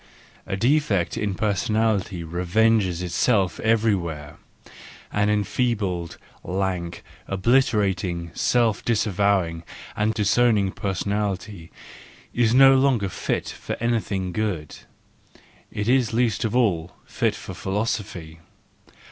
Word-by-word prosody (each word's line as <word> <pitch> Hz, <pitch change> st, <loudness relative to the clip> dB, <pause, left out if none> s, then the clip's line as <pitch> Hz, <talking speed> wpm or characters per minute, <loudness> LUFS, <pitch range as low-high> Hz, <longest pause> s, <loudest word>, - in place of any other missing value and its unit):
—A 95 Hz, -, -2 dB
defect 115 Hz, -, +1 dB
in 100 Hz, -2 st, -2 dB
personality 105 Hz, -2 st, 0 dB
revenges 90 Hz, +2 st, +1 dB
itself 95 Hz, +2 st, +1 dB
everywhere: 90 Hz, -10 st, 0 dB, 0.7 s
an 105 Hz, 0 st, +1 dB
enfeebled, 105 Hz, -5 st, -1 dB, 0.3 s
lank, 90 Hz, -2 st, -3 dB, 0.2 s
obliterated, 95 Hz, -, +1 dB
self 115 Hz, -4 st, +1 dB
disavowing 100 Hz, -6 st, +1 dB, 0.3 s
and 110 Hz, +1 st, 0 dB
disowning 105 Hz, -2 st, +2 dB
person¬ 95 Hz, -2 st, -3 dB
ality 100 Hz, -3 st, -3 dB, 0.6 s
is 120 Hz, -2 st, +2 dB
no 135 Hz, +2 st, +7 dB
longer 130 Hz, -7 st, +2 dB
fit -, -, -3 dB
for -, -, -6 dB
anything 110 Hz, -5 st, -1 dB
good—it 90 Hz, -6 st, -4 dB, 1.0 s
is 125 Hz, -3 st, +2 dB
least 120 Hz, 0 st, +1 dB
of 110 Hz, -, -2 dB
all 90 Hz, -8 st, +1 dB
fit -, -, -1 dB
for -, -, -8 dB
philosophy. 95 Hz, -5 st, -3 dB
100 Hz, 95 wpm, -23 LUFS, 90-115 Hz, 1.0 s, no